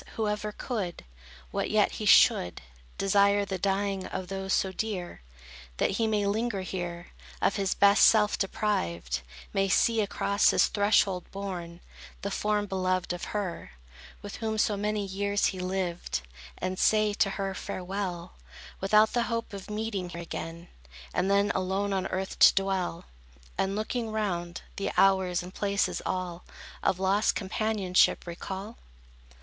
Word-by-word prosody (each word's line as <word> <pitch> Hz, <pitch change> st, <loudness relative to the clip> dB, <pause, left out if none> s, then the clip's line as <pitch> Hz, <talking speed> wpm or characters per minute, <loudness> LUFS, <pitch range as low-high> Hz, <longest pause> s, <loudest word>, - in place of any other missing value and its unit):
who 220 Hz, -1 st, 0 dB
ever 210 Hz, 0 st, -2 dB
could, 210 Hz, -6 st, -4 dB, 0.5 s
What -, -, -1 dB
yet -, -, +3 dB
he -, -, -4 dB
should, 90 Hz, -1 st, +5 dB, 0.3 s
Desire 200 Hz, +1 st, +3 dB
the 190 Hz, -1 st, -4 dB
dying 195 Hz, +1 st, 0 dB
day 185 Hz, -, -7 dB
of 185 Hz, -1 st, -4 dB
those 195 Hz, 0 st, -4 dB
so 190 Hz, -, +2 dB
dear, 190 Hz, -, -4 dB, 0.6 s
That -, -, +1 dB
he 220 Hz, +3 st, 0 dB
may 210 Hz, -2 st, +1 dB
linger 210 Hz, 0 st, 0 dB
here, 175 Hz, -2 st, -5 dB, 0.3 s
Of 200 Hz, -, +1 dB
his 195 Hz, -1 st, 0 dB
best 200 Hz, +1 st, +5 dB
self 210 Hz, -2 st, +4 dB
deprived, 85 Hz, -, -1 dB, 0.3 s
May 195 Hz, -1 st, +2 dB
see 225 Hz, +4 st, +3 dB
across 200 Hz, 0 st, +2 dB
his -, -, +4 dB
threshold 200 Hz, -3 st, +2 dB
borne, 180 Hz, -3 st, -6 dB, 0.4 s
The 200 Hz, -, -2 dB
form 210 Hz, +1 st, 0 dB
beloved 185 Hz, -2 st, -1 dB
of 175 Hz, -, -5 dB
her, 195 Hz, -, -4 dB, 0.5 s
With 205 Hz, -, -7 dB
whom 220 Hz, -1 st, -2 dB
so 210 Hz, -1 st, +2 dB
many 210 Hz, 0 st, -1 dB
years 200 Hz, +1 st, 0 dB
he 185 Hz, -, -7 dB
lived, 180 Hz, -, -2 dB, 0.4 s
And 185 Hz, 0 st, -3 dB
say 215 Hz, -1 st, +3 dB
to 200 Hz, -1 st, +2 dB
her 195 Hz, -1 st, -2 dB
farewell, 185 Hz, -2 st, -4 dB, 0.5 s
Without 210 Hz, +3 st, +4 dB
the 240 Hz, -, +2 dB
hope 230 Hz, -2 st, -3 dB
of 195 Hz, 0 st, -8 dB
meeting 210 Hz, -4 st, -3 dB
here 170 Hz, 0 st, -6 dB
again; 165 Hz, +1 st, -6 dB, 0.5 s
And 180 Hz, +2 st, +1 dB
then 200 Hz, +1 st, +3 dB
alone 190 Hz, +2 st, -1 dB
on 190 Hz, -1 st, 0 dB
earth 190 Hz, +1 st, -4 dB
to -, -, +8 dB
dwell, 190 Hz, -3 st, -1 dB, 0.5 s
And, 195 Hz, +1 st, 0 dB
looking 225 Hz, +2 st, -2 dB
round, 180 Hz, -5 st, -2 dB
the 200 Hz, -, -1 dB
hours 190 Hz, -2 st, +3 dB
and 180 Hz, +1 st, -10 dB
places 200 Hz, -1 st, 0 dB
all, 180 Hz, -2 st, -3 dB, 0.4 s
Of 180 Hz, -, +1 dB
lost 195 Hz, +3 st, +2 dB
companionship 195 Hz, -2 st, +1 dB
recall? 190 Hz, +5 st, -6 dB
195 Hz, 150 wpm, -28 LUFS, 185-205 Hz, 0.6 s, to